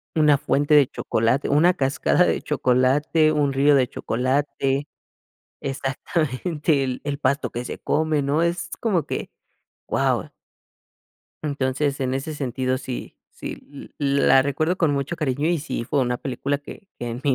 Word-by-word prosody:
una 150 -2 +5
fuente 145 +2 +1
de 145 -3 +6
chocolate, 115 +5 0
una 165 +6 +4
cascada 140 +4 +2
de - - 0
chocolate, 145 +4 +2
un 145 -3 +1
río 140 +2 +4
de 130 -2 +3
chocolate, 135 +3 -1 0.7
exactamente 140 +2 -1 0.2
el 145 -1 -3
pasto 140 -2 0
que 120 +1 -4
se - - -5
come, 155 -1 +1
¿no?, 140 +3 +1
es 170 +1 -1
como 195 -8 +1
que, - - -4 0.6
guau. - - 0 1.1
Entonces, 140 0 -1
en 130 -1 -1
ese 135 +4 -3
sentido 130 -2 -1
sí 130 -2 -6
sí, 140 -1 -9
l 140 -1 +2
la 135 - +7
recuerdo 155 +6 0
con 160 -6 +2
mucho 140 +5 -2
cariño, 145 0 0
y 175 - +2
sí 140 -5 -4
fue 140 +4 0
una 125 -1 0
película 140 +2 -2
que 190 +7 -12
que 120 - -4
en 120 +2 -5
mi 140 - +2
140 Hz, 150 wpm, -23 LUFS, 130-150 Hz, 1.1 s, la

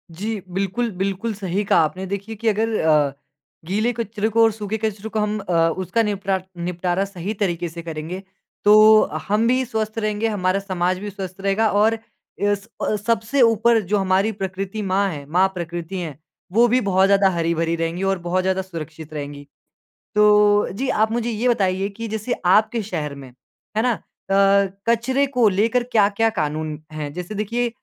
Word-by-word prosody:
जी 210 +3 -3
बिल्कुल, 195 +5 -1
बिल्कुल 195 +4 -2
सही 195 0 -2
कहा - - +3
आपने। 185 +5 -3
देखिए 200 +3 -5
कि 225 +2 -4
अगर 220 +1 +1
अ, 150 -3 +3 0.5
गीले 215 +7 0
कचरे 220 -1 -2
को 225 +1 +4
और 225 - +5
सूखे 210 0 -4
कचरे 215 0 -3
को 215 - -2
हम 210 0 0
अ, 185 -3 -4 0.2
उसका 190 +5 0
निपटा 195 -2 -1 0.2
निपटारा 180 +2 -1
सही 195 +1 -5
तरीके 175 -4 -2
से 170 +1 -8
करेंगे। 165 +3 -5 0.4
तो 215 +1 +7 0.3
हम 215 +3 +2
भी 255 +1 +2
स्वस्थ 220 -2 -3
रहेंगे, 215 +1 -1
हमारा 195 -2 0
समाज 185 -2 -1
भी 205 +1 -5
स्वस्थ 190 -1 -7
रहेगा 200 +3 +2
और 220 +2 +3 0.4
एस 205 0 0
अ, 215 - 0
सबसे 230 +5 0
ऊपर 230 0 +4
जो 205 +2 0
हमारी 195 +3 +2
प्रकृति 195 +1 -4
माँ 195 +1 +1
है, 145 -4 -6
माँ 180 +6 +3
प्रकृति 170 +1 -5
है। 155 -5 -5 0.4
वो 235 +3 +5
भी 250 +2 +3
बहुत 190 -1 +3
ज़्यादा 195 -1 +4
हरी-भरी 165 -1 0
रहेंगी 165 +2 -2
और 195 -1 +1
बहुत 185 +1 +1
ज़्यादा 190 0 +1
सुरक्षित 160 -3 -8
रहेंगी। 145 -1 -6 0.7
तो 210 0 +5
जी, 255 +7 -3
आप 220 +1 +2
मुझे 240 0 -1
ये 230 +2 -1
बताइए 195 -3 +1
कि 230 +3 -7
जैसे 220 +3 -2
आपके 215 +5 +3
शहर 155 -8 -4
में। 135 -2 -10 0.5
है - - +4
ना? 250 - +3 0.4
अ, 195 0 +4 0.2
कचरे 260 +4 +2
को 250 -5 +3
लेकर 225 +6 +1
क्या-क्या 215 +1 +3
कानून 155 0 -2
हैं? 150 -2 -5
जैसे 180 +4 -6
देखिए 235 +4 -1
200 Hz, 175 wpm, -21 LUFS, 180-220 Hz, 0.7 s, तो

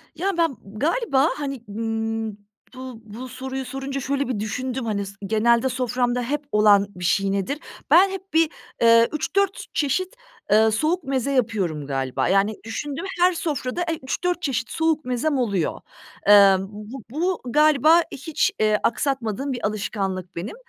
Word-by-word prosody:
Ya, 365 +3 -1
ben 330 -7 +1 0.2
galiba, 305 - +2
hani, 275 -4 -5
ımm, 225 +1 -2 0.4
bu 255 -3 -8
bu 225 +5 -8
soruyu 265 +1 -5
sorunca 270 +2 -4
şöyle 280 +1 -1
bir 245 -5 -2
düşündüm. 250 +4 -3
Hani 200 -2 -1
s 200 - -9
genelde 230 +4 +3
soframda 250 0 0
hep 290 +4 -3
olan 205 -1 +5
bir 180 0 -5
şey 195 +2 +2
nedir? 200 +10 -2 0.3
Ben 385 +3 +7
hep 385 -1 -8
bir, 325 -1 +4 0.3
ııı, 230 0 +6
3-4 390 +6 -1
çeşit, 360 - -1 0.4
ııı, 220 +1 +5
soğuk 315 +10 0
meze 270 -1 -1
yapıyorum 205 - 0
galiba. 135 -2 -1
Yani, 195 +3 +2
düşündüm 285 - -5
her 360 +1 +5
sofrada, 305 -3 -3
eee, 325 -1 -2
3-4 350 +6 -1
çeşit 255 -7 -2
soğuk 320 -1 0
mezem 255 +4 0
oluyor. 200 -9 -1 0.5
Emm, 195 -2 +7
bu 215 +4 -9
bu 345 +5 -1
galiba, 305 +4 +5
eee, - - +1
hiç, 315 +8 0
eee, 215 -1 +3
aksatmadığım 265 0 -1
bir 245 - -1
alışkanlık 195 -3 -3
benim. 175 - -5
250 Hz, 155 wpm, -23 LUFS, 215-295 Hz, 0.5 s, Ben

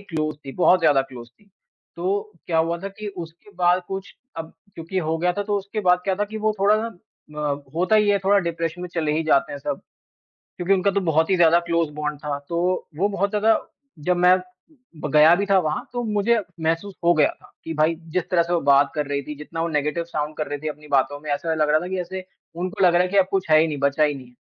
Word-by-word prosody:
Close 155 -6 -3
थी। 135 - -6
बहुत 180 0 +4
ज़्यादा 145 -4 +4
क्लोज 125 -3 -11
थी, 165 - -29 0.5
तो 200 +4 -2
क्या 165 -2 +1
हुआ 165 +1 +1
था 195 - -5
कि 205 +1 -7
उसके 170 +3 -9
बाद 180 0 +3
कुछ 195 0 -6 0.2
अब 165 0 -6 0.2
क्योंकि 170 +3 -4
हो 160 -1 -1
गया 180 +1 +1
था, 205 - -2
तो 205 0 -1
उसके 200 +2 -5
बाद 180 -2 +4
क्या 190 -1 +1
था 205 +2 -1
कि, 215 +1 -8
वो 215 0 +1
थोड़ा 205 +2 +5
अ, 150 -9 -5
होता 185 +6 +3
ही 210 -1 +3
है, 200 -1 +4
थोड़ा 195 +1 +3
डिप्रेशन 170 -1 -3
में 180 - -5
चले 155 -3 0
ही 160 - 0
जाते 140 -3 +2
हैं 140 - -5
सब - - -4 0.8
क्योंकि 180 +2 +2
उनका 195 +1 +2
तो 200 0 0
बहुत 160 -1 +2
ही 190 - +4
ज़्यादा 170 -1 +5
क्लोज़ 170 -2 +1
बॉन्ड 150 -1 -4
था, 145 -1 -3
तो 175 +2 0
वो 195 +5 +2
बहुत 200 0 0
ज़्यादा 215 +2 +3 0.4
जब 180 +4 +1
मैं 180 +1 +6 0.6
ब 150 - -3
गया 155 +2 +7
भी 200 +3 -1
था 195 -1 +3
वहाँ, 155 -2 -2
तो 245 - -2
मुझे 215 +1 +2 0.2
महसूस 165 +5 -1
हो 170 +1 +5
गया 155 -3 +4
था - - -19
कि, 165 - -5
भाई 155 +2 +2 0.2
जिस 180 -1 0
तरह 170 -2 +3
से 175 - -3
वो 170 - +3
बात 140 0 +4
कर 150 -1 -1
रही 140 0 -1
थी। 150 - -7
जितना 165 +2 -7
वो 170 - 0
नेगेटिव 150 +2 -1
साउंड 155 -2 -4
कर 155 - -2
रही 145 - -3
थी 155 - -5
अपनी 150 0 -7
बातों 140 0 +1
में, 150 0 -9
ऐसा 160 +3 -1
लग 155 -1 +1
रहा 155 +1 +4
था 175 - -5
कि 190 0 -3
ऐसे 185 +1 -6 0.3
उनको 185 +3 -2
लग 175 - +5
रहा 175 - +5
है 185 - 0
कि 200 - 0
अब 190 - +6
कुछ 190 -3 -1
है 155 - +7
ही 160 - +3
नहीं, 150 -2 -3
बचा 140 +2 +2
ही 150 -1 +2
नहीं 130 -2 -10
है, 125 - -21
170 Hz, 260 wpm, -23 LUFS, 150-190 Hz, 0.8 s, गया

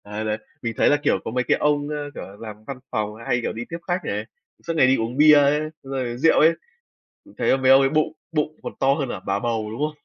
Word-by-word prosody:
Đấy, 105 +1 -5
đấy. 105 0 -1 0.2
Mình 115 -2 -3
thấy - - +4
là, 145 - +4
kiểu, - - +2
có - - -3
mấy 125 +1 0
cái - - +2
ông, 145 -1 +1
ơ, 150 -1 -4
kiểu - - -7
là, 100 - -11
làm 110 -1 -9
văn 135 -2 -6
phòng 105 0 -2
hay, 125 - +1
kiểu, - - -3
đi 115 +2 -6
tiếp 165 - -4
khách 180 0 -1
này, 105 +2 -3 0.4
suốt 165 - 0
ngày 140 -5 +5
đi 130 - +4
uống 115 +3 -3
bia 150 +1 +7
ấy, 145 +1 +4 0.2
rồi 130 -3 -4
rượu 160 +6 +4
ấy, 160 +2 +6 0.7
mình - - -18
thấy 135 - +2
mấy 130 0 +3
ông 135 0 +8
ấy 135 - +3
bụng 155 +1 +1 0.2
bụng 155 0 -1
còn - - -5
to 135 +1 +4
hơn 140 -3 -2
cả 105 - -5
bà 100 0 0
bầu, 110 -1 -2
đúng 115 - -7
không? 150 0 -2
135 Hz, 275 wpm, -23 LUFS, 115-150 Hz, 0.7 s, ông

